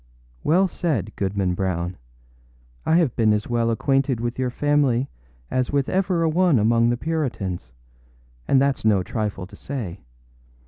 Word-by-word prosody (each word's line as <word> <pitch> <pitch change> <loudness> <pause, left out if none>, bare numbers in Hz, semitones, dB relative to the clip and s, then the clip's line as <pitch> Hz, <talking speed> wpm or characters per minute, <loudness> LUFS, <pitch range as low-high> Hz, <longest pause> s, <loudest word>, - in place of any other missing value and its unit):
âWell 185 +5 +4
said, 155 - -2
Goodman 95 -2 -1
Brown! 90 -1 -2 0.9
I 160 - +4
have 165 -8 +2
been 110 -2 +3
as 105 +1 -1
well 120 -1 +1
acquainted 135 +1 +1
with 120 +2 -3
your 130 -1 +1
family 140 -2 +1 0.4
as 130 -1 0
with 140 -2 +1
ever 185 -3 +1
a - - +3
one 170 -2 +3
among 115 +2 +3
the 120 - +1
Puritans; 120 - -3 0.8
and 135 - +4
thatâs 140 -1 +1
no 105 -4 +3
trifle 105 -2 -3
to 95 - -14
say. 110 -10 -5
120 Hz, 150 wpm, -23 LUFS, 105-145 Hz, 0.9 s, âWell